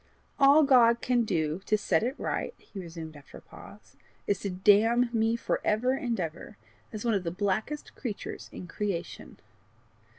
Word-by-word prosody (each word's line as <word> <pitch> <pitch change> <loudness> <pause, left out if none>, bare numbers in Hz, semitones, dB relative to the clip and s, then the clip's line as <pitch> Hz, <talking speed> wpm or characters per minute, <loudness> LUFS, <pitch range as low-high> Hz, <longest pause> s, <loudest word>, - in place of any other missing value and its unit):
"All 280 +3 +7
God 240 -4 +5
can 245 -2 +1
do 160 -2 -1
to 215 - +3
set 180 -5 +1
it 255 +5 -2
right," - - -3
he 200 - -11
resumed, 165 -3 -8
after 145 -1 -13
a - - -13
pause, - - -15 0.3
"is 200 -2 0
to 200 - -3
damn 215 +6 +3
me 225 0 +2
for 235 - -2
ever 225 +5 +1
and 240 -4 -2
ever, 165 -3 -6 0.3
as 215 +1 -6
one 230 - +2
of 195 -3 0
the 170 - -2
blackest 205 - -3
creatures 225 -7 -6
in - - -8
creation." 180 -1 -5
210 Hz, 170 wpm, -28 LUFS, 180-240 Hz, 0.3 s, All